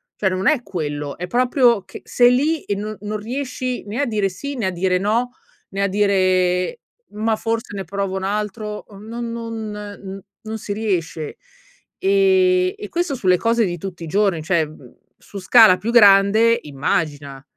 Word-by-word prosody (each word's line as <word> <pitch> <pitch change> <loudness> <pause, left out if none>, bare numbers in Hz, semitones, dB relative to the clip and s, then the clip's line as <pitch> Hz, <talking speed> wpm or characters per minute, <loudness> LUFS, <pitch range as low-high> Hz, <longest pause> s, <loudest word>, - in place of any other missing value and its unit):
Cioè 195 - 0
non 185 +1 -1
è 300 -5 +3
quello. 145 -6 -4
È 180 - -5
proprio 245 -1 +3
che - - -11
sei 245 0 +4
lì 305 +4 +1
e 205 - -2
no 210 +1 -5
non 210 +1 -3
riesci 255 +2 -4
né 210 +6 -3
a - - +1
dire 210 -5 0
sì, 280 +10 -6
né 235 -6 -2
a - - 0
dire 180 +1 +1
no, 225 +5 0 0.4
né 195 0 -2
a 200 - +2
dire: 185 - +1 0.3
"Ma 220 +1 0
forse 225 0 -3
ne 195 - -4
provo 195 +2 -3
un 190 - -5
altro". 210 +1 -3
Uhm, 200 -1 -13
non 235 +1 -5
non, 220 -3 -6
uhm, 195 0 -7 0.2
non 220 0 -5
si 210 -1 -5
riesce 175 -7 -3 0.6
ehm 390 +1 +2 0.6
e 415 - -5
questo 345 -3 -1
sulle 185 -7 +3
cose 230 +1 +2
di 175 -2 -3
tutti 175 0 -7
i - - -6
giorni, 195 -1 +1
cioè, 170 +1 +2
uhm, 150 -5 -12 0.2
su 200 - -10
scala 195 0 +6
più 220 +6 -3
grande, 215 +1 +6
immagina. 145 -1 -3
205 Hz, 180 wpm, -20 LUFS, 185-230 Hz, 0.6 s, scala